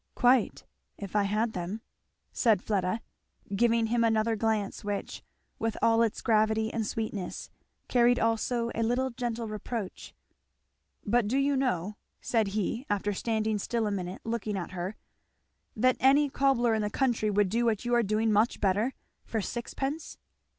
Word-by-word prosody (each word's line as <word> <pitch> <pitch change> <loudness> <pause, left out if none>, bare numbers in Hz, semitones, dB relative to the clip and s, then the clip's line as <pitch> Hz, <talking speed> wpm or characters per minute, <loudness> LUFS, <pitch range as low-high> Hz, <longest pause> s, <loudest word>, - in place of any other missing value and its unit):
"Quite 245 -2 +3 0.3
if 200 0 -8
I 205 -1 +3
had 215 +3 0
them," 185 +5 -4 0.5
said 220 -6 +3
Fleda, 200 +1 0 0.5
giving 230 +1 +3
him 230 +1 +1
another 225 0 +2
glance 215 -2 -1
which, 205 -1 -4 0.4
with 225 -1 -1
all 230 0 +4
its 230 -2 0
gravity 220 0 +2
and 225 -2 -1
sweetness, 210 -5 -4 0.4
carried 245 0 +4
also 230 +1 0
a - - -2
little 250 +3 +1
gentle 235 -1 -3
reproach. 215 -1 -6 0.9
"But 230 +1 +2
do 250 +6 +1
you 280 +1 +2
know," 210 -7 -1 0.2
said 225 -3 +1
he 225 +4 -1
after 205 0 0
standing 220 0 -1
still 230 +2 -1
a 210 - -1
minute 185 -1 -4
looking 225 -3 -2
at 180 - -5
her, 185 +3 -4 0.8
"that 255 +3 +3
any 280 +2 +4
cobbler 265 -4 +2
in 220 - +1
the 210 - -1
country 235 -2 +1
would 205 -1 +2
do 235 +4 +1
what 225 -1 0
you 240 - 0
are 240 - +5
doing 215 +1 +1
much 215 +3 +2
better 205 +6 +1 0.3
for 225 - -3
sixpence?" 270 +8 -4
225 Hz, 155 wpm, -29 LUFS, 205-240 Hz, 0.9 s, are